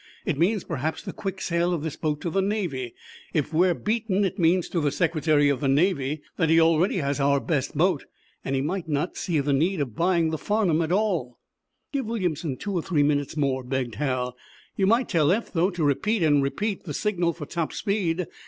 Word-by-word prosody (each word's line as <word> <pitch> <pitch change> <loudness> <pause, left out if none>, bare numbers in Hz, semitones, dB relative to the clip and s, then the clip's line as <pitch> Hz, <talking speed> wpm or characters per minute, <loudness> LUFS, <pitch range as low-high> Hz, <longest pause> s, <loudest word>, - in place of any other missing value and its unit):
It - - 0
means, 190 +3 +2
perhaps, 160 +1 -3
the - - -6
quick 195 -1 -5
sale 175 -1 0
of 155 - -5
this 160 -3 -3
boat 150 -2 -2
to 170 - -3
the 195 - +1
Navy. 175 - -2 0.4
If 155 0 0
we're 175 +2 +3
beaten 210 -2 0
it 195 - -3
means, 175 +1 +3
to 170 - -1
the 150 - +2
Secretary 155 -2 +2
of 140 -3 +1
the 140 - 0
Navy, 145 -1 +1
that 165 -3 +2
he 165 +1 +6
already 165 +4 +3
has 140 -3 -1
our 140 0 +3
best 145 -1 -2
boat, 175 -2 +2 0.4
and 135 - -1
he 135 - +1
might 175 +3 -3
not 150 +3 -1
see 165 -4 -1
the 140 0 0
need 165 +6 +1
of 130 -7 -3
buying 170 0 +2
the 160 - -3
'Farnum' 195 -6 +1
at 165 0 -1
all." 180 - 0 0.6
"Give 270 -5 -1
Williamson 175 - -2
two 205 - -4
or 175 - 0
three 155 -4 +1
minutes 145 +1 0
more," 135 -3 0
begged 125 -2 -2
Hal. 125 -3 -1 0.4
"You 195 - +2
might 235 +4 +3
tell 160 -4 +3
Eph, 220 +5 -1
though, 175 +2 +2
to 175 -4 -3
repeat, 180 - +1
and 145 -2 +4
repeat, 200 +10 -2
the 150 -5 -5
signal 180 -5 0
for 155 -3 -7
top 165 +1 -3
speed. 185 -4 -1
165 Hz, 215 wpm, -25 LUFS, 145-185 Hz, 0.6 s, he